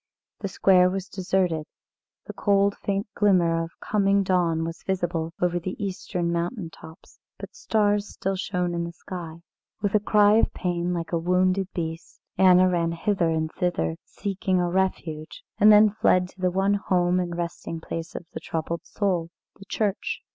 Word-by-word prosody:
The 200 Hz, -, -3 dB
square 185 Hz, -1 st, +4 dB
was 190 Hz, 0 st, -4 dB
deserted, 185 Hz, -5 st, -1 dB, 0.6 s
the -, -, -7 dB
cold 200 Hz, 0 st, +2 dB
faint 200 Hz, +1 st, -2 dB
glimmer 175 Hz, -5 st, +3 dB
of 165 Hz, -, -6 dB
coming 200 Hz, -1 st, +2 dB
dawn 175 Hz, -4 st, +1 dB
was 165 Hz, +1 st, -5 dB
visible 175 Hz, -3 st, -2 dB
over 175 Hz, 0 st, +1 dB
the 185 Hz, +2 st, -5 dB
eastern 180 Hz, -3 st, -3 dB
mountain 170 Hz, +1 st, -3 dB
tops, 160 Hz, 0 st, -15 dB, 0.2 s
but -, -, -9 dB
stars 210 Hz, -, +1 dB
still 195 Hz, +1 st, -3 dB
shone 180 Hz, -2 st, -2 dB
in 170 Hz, 0 st, -1 dB
the 170 Hz, 0 st, -6 dB
sky. 170 Hz, -1 st, -8 dB, 0.4 s
With 205 Hz, -2 st, -1 dB
a 215 Hz, -, +5 dB
cry 210 Hz, 0 st, +4 dB
of -, -, +3 dB
pain, 175 Hz, -1 st, -1 dB
like 170 Hz, -2 st, -3 dB
a 170 Hz, -, +1 dB
wounded 185 Hz, +2 st, +1 dB
beast, 165 Hz, -1 st, -5 dB, 0.2 s
Anna 185 Hz, -1 st, +6 dB
ran 170 Hz, -2 st, 0 dB
hither 175 Hz, 0 st, 0 dB
and 160 Hz, -1 st, -1 dB
thither 80 Hz, -, -1 dB
seeking 190 Hz, -2 st, -2 dB
a 175 Hz, -1 st, 0 dB
refuge, 170 Hz, -4 st, -2 dB, 0.2 s
and 210 Hz, +1 st, +8 dB
then 210 Hz, 0 st, +7 dB
fled 185 Hz, -3 st, +2 dB
to 185 Hz, -, -17 dB
the 185 Hz, -, +3 dB
one 195 Hz, +2 st, +1 dB
home 180 Hz, -3 st, +1 dB
and 175 Hz, -1 st, -3 dB
resting 170 Hz, -1 st, -4 dB
place 165 Hz, +1 st, -6 dB
of -, -, -6 dB
the -, -, -5 dB
troubled 165 Hz, +1 st, -4 dB
soul 180 Hz, -5 st, -1 dB, 0.3 s
the 195 Hz, -, -12 dB
church. 205 Hz, -1 st, -2 dB
180 Hz, 170 wpm, -25 LUFS, 170-195 Hz, 0.6 s, and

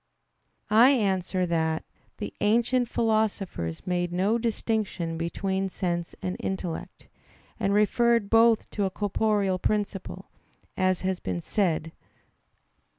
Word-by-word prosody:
I 230 Hz, +4 st, +7 dB
answer 190 Hz, -7 st, +1 dB
that, 160 Hz, -2 st, 0 dB, 0.3 s
The -, -, -5 dB
ancient 235 Hz, +3 st, +2 dB
philosophers 215 Hz, -, -1 dB
made 175 Hz, -1 st, -1 dB
no 195 Hz, +6 st, +1 dB
distinction 215 Hz, -7 st, -2 dB
between 190 Hz, +3 st, -2 dB
sense 175 Hz, -2 st, -3 dB
and 185 Hz, 0 st, -2 dB
intellect, 185 Hz, -3 st, -5 dB, 0.5 s
and 195 Hz, -, +1 dB
referred 230 Hz, +2 st, +3 dB
both 225 Hz, +1 st, +4 dB
to 205 Hz, -, -1 dB
a -, -, 0 dB
corporeal 205 Hz, -1 st, 0 dB
principle, 205 Hz, -1 st, -3 dB, 0.4 s
as 185 Hz, -1 st, +1 dB
has 185 Hz, -1 st, -1 dB
been 90 Hz, -2 st, -3 dB
said 165 Hz, -, 0 dB
(A. -, -, -20 dB
195 Hz, 115 wpm, -27 LUFS, 175-220 Hz, 0.5 s, I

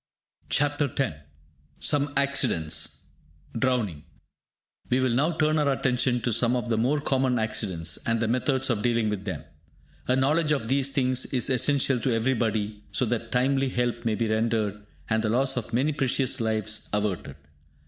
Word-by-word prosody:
CHAPTER 145 Hz, -1 st, +1 dB
X 135 Hz, -, 0 dB, 0.6 s
SOME 145 Hz, -1 st, +1 dB
ACCIDENTS: 85 Hz, -, 0 dB, 0.6 s
DROWNING 110 Hz, -, 0 dB, 0.9 s
We 125 Hz, -, +2 dB
will 130 Hz, -1 st, +2 dB
now 145 Hz, +8 st, +2 dB
turn 155 Hz, -1 st, +2 dB
our 145 Hz, -2 st, +2 dB
attention 125 Hz, -2 st, +1 dB
to 120 Hz, 0 st, 0 dB
some 120 Hz, +3 st, +2 dB
of 120 Hz, -1 st, -2 dB
the 115 Hz, -, +1 dB
more 135 Hz, +6 st, +2 dB
common 130 Hz, -3 st, +1 dB
accidents, 95 Hz, -7 st, -1 dB
and 115 Hz, 0 st, +2 dB
the 115 Hz, -, 0 dB
methods 130 Hz, +2 st, +1 dB
of 105 Hz, -3 st, -1 dB
dealing 115 Hz, -1 st, +1 dB
with 100 Hz, -1 st, -4 dB
them. 95 Hz, -, -4 dB, 0.6 s
A 125 Hz, -, +3 dB
knowledge 150 Hz, +4 st, +2 dB
of 115 Hz, -6 st, -2 dB
these 135 Hz, 0 st, +2 dB
things 130 Hz, -2 st, 0 dB
is 130 Hz, -1 st, +1 dB
essential 135 Hz, 0 st, +2 dB
to 120 Hz, 0 st, +1 dB
everybody, 110 Hz, -3 st, -1 dB
so 125 Hz, -, +1 dB
that 115 Hz, 0 st, -3 dB
timely 135 Hz, +2 st, +2 dB
help 120 Hz, -1 st, -1 dB
may 115 Hz, -2 st, 0 dB
be 115 Hz, +1 st, -1 dB
rendered, 110 Hz, -2 st, 0 dB, 0.2 s
and 110 Hz, 0 st, +1 dB
the 110 Hz, -, 0 dB
loss 130 Hz, +4 st, +1 dB
of 120 Hz, -2 st, -4 dB
many 135 Hz, +6 st, +1 dB
precious 135 Hz, -1 st, 0 dB
lives 110 Hz, -1 st, 0 dB
averted. 100 Hz, -9 st, -2 dB
125 Hz, 165 wpm, -26 LUFS, 110-135 Hz, 0.9 s, A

